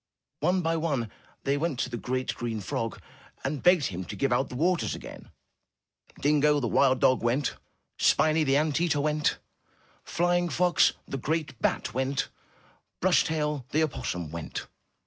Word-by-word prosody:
One 180 +4 +1
by 165 0 +1
one, 140 -9 -1 0.3
they 140 +1 +1
went 155 -2 -1
to - - -2
the - - -3
great, 130 +2 -2
green 115 -2 -3
frog 115 +2 -3 0.4
and 140 +1 -2
begged 175 -5 +5
him 90 +2 -4
to - - -7
give 135 -3 +1
out 130 +2 +1
the - - -7
waters 175 +6 +1
again. - - -10 0.9
Dingo, 150 0 +3
the 125 - -1
wild 130 +2 +3
dog, 130 -1 +4
went; 125 +4 +1 0.5
Spiny, 155 +1 +4
the 135 -1 +3
ant 155 +1 +1
eater, 165 -4 +2
went; 150 +1 +1 0.7
Flying 175 0 +1
fox, 175 -1 +3
the 135 - -4
great 150 -3 -2
bat, - - 0
went; 130 +2 -1 0.7
Brush - - +4
tail, 150 -4 -2
the 155 +2 +2
opossum, 105 - -3
went. 85 -1 -5
145 Hz, 160 wpm, -28 LUFS, 125-160 Hz, 0.9 s, begged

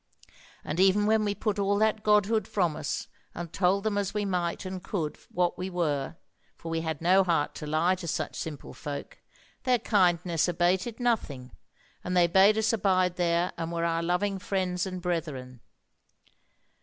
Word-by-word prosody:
And 165 - -4
even 195 +2 +4
when 220 0 +3
we 205 -1 -1
put 210 0 -2
all 200 0 +2
that 215 0 +2
Godhood 210 0 +2
from 175 -6 0
us, 145 - -3 0.3
and 170 0 -6
told 190 +2 +2
them 210 -2 0
as 200 +1 -3
we 210 -1 0
might 180 -2 -2
and 185 0 -5
could 165 -7 -3
what 175 -1 0
we 185 +1 -3
were 155 -6 -1 0.4
(for 165 - -8
we 165 0 -1
had 160 -1 -4
no 190 +3 +5
heart 165 -5 0
to 150 - -5
lie 160 +4 +2
to 180 -2 -6
such 155 -1 -2
simple 155 -3 -6
folk), 145 -1 -7 0.4
their 255 -1 +3
kindness 180 -6 +2
abated 180 +6 0
nothing, 145 - -1 0.5
and 180 0 -1
they 175 - +6
bade 195 +5 +5
us 220 +1 +2
abide 185 -4 +2
there, 175 0 +1
and 165 0 -3
were 170 0 -1
our 165 0 0
loving 190 +3 0
friends 185 -1 -1
and 185 -1 -6
brethren. 145 -8 -4
180 Hz, 175 wpm, -28 LUFS, 165-200 Hz, 0.5 s, they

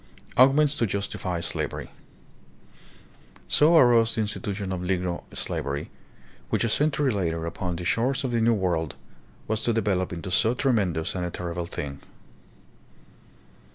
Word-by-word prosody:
Arguments 140 +3 +5
to 115 - +1
Justify 95 -3 -2
Slavery. 85 - -4 1.6
So 160 +3 +5
arose 120 -4 +5
the 110 - 0
insti 105 - -3
tution 100 -4 -3
of 90 - -3
Negro 90 -1 -1
slavery, 70 0 -3 0.6
which - - +1
a 115 - +1
century 145 +2 +2
later 85 -5 -1
upon 90 +1 -3
the 90 +1 -5
shores 125 - +1
of 130 - -1
the 115 -1 +1
New 115 0 +4
World 85 -6 -1 0.5
was 110 0 0
to 120 - +1
develop 100 -4 0
into 85 +1 -5
so 110 +5 +3
tremen 115 -9 +1
dous 80 0 -3
and 90 -2 -3
terrible 85 0 -4
a - - -9
thing. 70 -4 -6
100 Hz, 150 wpm, -26 LUFS, 90-120 Hz, 1.6 s, Arguments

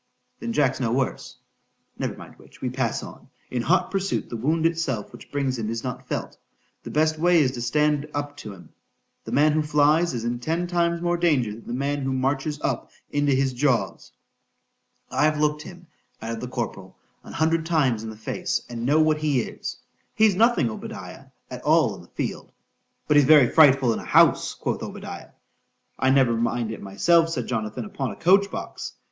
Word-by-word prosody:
_ - - -45
Then 235 0 -4
Jack's 135 - +1
no 120 -4 0
worse.—Never 130 +1 -5
mind - - -13
which,—we - - -7
pass - - -1
on,—in 125 - -8
hot 180 +7 +1
pursuit 195 0 -2
the - - -3
wound 155 +8 0
itself 160 -10 -1
which - - -13
brings 135 -3 -1
him 110 -1 -3
is 115 0 -4
not 125 -2 -6
felt,—the - - -8
best 155 +1 +1
way 175 +1 +4
is 135 -4 +3
to 125 -2 -6
stand 150 +4 +1
up 145 0 -4
to 105 - -8
him,—the 95 -3 -16
man 150 +2 +4
who 155 - +2
flies, 150 +1 +2
is 115 - -3
in 120 +1 -2
ten 165 +7 -1
times 170 -1 0
more 175 0 +1
danger 150 -10 +2
than 110 +2 -11
the - - -4
man 140 +3 -1
who 135 0 -1
marches 135 +3 -1
up - - -2 0.2
into 145 0 +1
his 135 0 +1
jaws.—I've 140 +2 -3
look'd 150 0 +1
him, 175 +2 -11 0.3
added 115 0 -5
the 125 - -4
corporal, 110 -6 -5 0.3
an - - -11
hundred 160 +2 +1
times 145 -9 +1
in 110 - -5
the 110 - -9
face,—and 120 - -3
know 150 +3 +4
what 155 -1 +3
he 145 -5 +1
is.—He's 215 - -2
nothing, 215 - +3
Obadiah, - - -8 0.3
at - - -6
all - - +3
in - - -11
the - - -17
field.—But 150 - -4
he's 145 - +6
very 150 -5 +7
frightful 135 -6 +5
in - - -4
a - - -9
house, - - +4
quoth - - -3
Obadiah.——I 130 - -7
never 130 -3 +4
mind 115 0 -1
it 110 - -7
myself, 165 - +3
said 165 - -3
Jonathan, 110 - -3
upon 140 -11 -4
a 100 - -7
coach 195 - +4
box. - - -6
145 Hz, 175 wpm, -24 LUFS, 120-160 Hz, 0.3 s, very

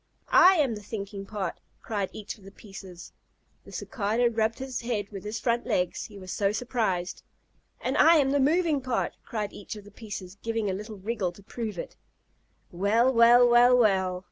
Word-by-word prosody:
"I 375 +2 +8
am 285 -8 +2
the 210 - -7
thinking 200 -1 -6
part," 200 -5 -4 0.2
cried 205 -4 -3
each 215 +1 -8
of - - -19
the 195 - -11
pieces. 195 -3 -12 0.5
The - - -13
Cicada 230 +2 0
rubbed 225 0 0
his 265 -1 -5
head 230 -4 -2
with 195 -2 -7
his 210 +1 -4
front 235 +2 0
legs, 180 -7 -1
he 205 - -12
was 185 -2 -8
so 200 -1 +1
surprised. 215 -6 -2 0.6
"And - - -2
I 335 - +6
am 275 -4 +3
the 285 - +2
moving 305 +1 +2
part," 255 -2 -2
cried 210 -3 -4
each 205 - -8
of 210 - -10
the 205 - -15
pieces, 200 -3 -8
giving 225 -3 -1
a - - -2
little 210 +2 -7
wriggle 200 -2 -2
to 200 - -16
prove 215 -1 -5
it. - - -7 0.7
"Well, 220 +8 +2
well, 240 +1 +7
well, 240 +1 +6
well!" 190 -5 +2
215 Hz, 190 wpm, -27 LUFS, 195-240 Hz, 0.7 s, I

